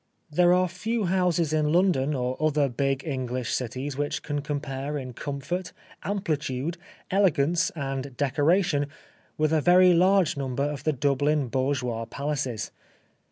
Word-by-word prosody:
There 175 +3 +4
are 185 0 +4
few 215 +5 -2
houses 175 -3 +1
in 150 -1 +2
London 155 -5 +2
or 125 0 -1
other 150 -2 +3
big 135 +2 -1
English 130 -4 -3
cities 130 +3 -3
which 145 0 -2
can 145 -1 -2
compare 145 -1 -3
in 130 -3 -6
comfort, 150 +8 -4 0.3
amplitude, 165 -5 -2 0.3
elegance 175 -4 +3
and 135 -3 -4
decoration 145 +2 +2 0.5
with 155 0 +1
a 155 - +3
very 180 +2 +6
large 185 -1 +4
number 135 -1 -2
of 145 -2 -3
the 155 - +3
Dublin 145 0 +1
bourgeois 130 -3 -1
palaces. 135 -2 -3
145 Hz, 135 wpm, -26 LUFS, 135-170 Hz, 0.5 s, very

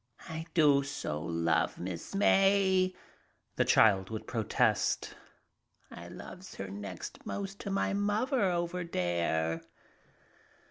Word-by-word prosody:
"I 160 0 -5
do 145 -4 +5
so 75 - -4
love 85 0 0
Miss 90 - -6
May," 195 -2 +4 0.6
the - - +3
child 95 -3 +5
would 110 -1 -5
protest. 110 -4 +1 0.8
"I 85 - -9
loves 185 - -10
her 100 - -6
next 100 -2 -7
most 200 0 -5
to - - -5
my 195 0 0
muvver 210 +7 +1
over 175 +1 -1
dere." 85 - -1
145 Hz, 110 wpm, -31 LUFS, -, 0.8 s, do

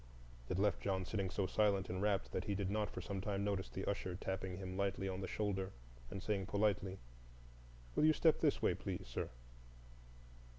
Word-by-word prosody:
It 90 - 0
left 100 +1 +2
John 95 -2 0
sitting 95 -1 -1
so 100 +1 0
silent 100 -1 +3
and 95 +1 -2
rapt 100 -1 +1
that 95 - -1
he 100 - 0
did 100 -1 0
not 105 0 +1
for - - -5
some 100 -2 -3
time 100 0 -1
notice 100 -2 0
the 95 - -4
usher 95 -3 -1
tapping 95 -1 -3
him 95 -1 -5
lightly 100 0 0
on 95 0 -2
the 95 - -2
shoulder 95 -2 -1 0.4
and 95 - -5
saying 100 -3 0
politely, 100 -2 +1 1.0
"Will - - +4
you 155 - +7
step 160 0 +4
this - - +2
way, - - +5
please, - - -4
sir?" - - -2
100 Hz, 195 wpm, -38 LUFS, 95-100 Hz, 1.0 s, you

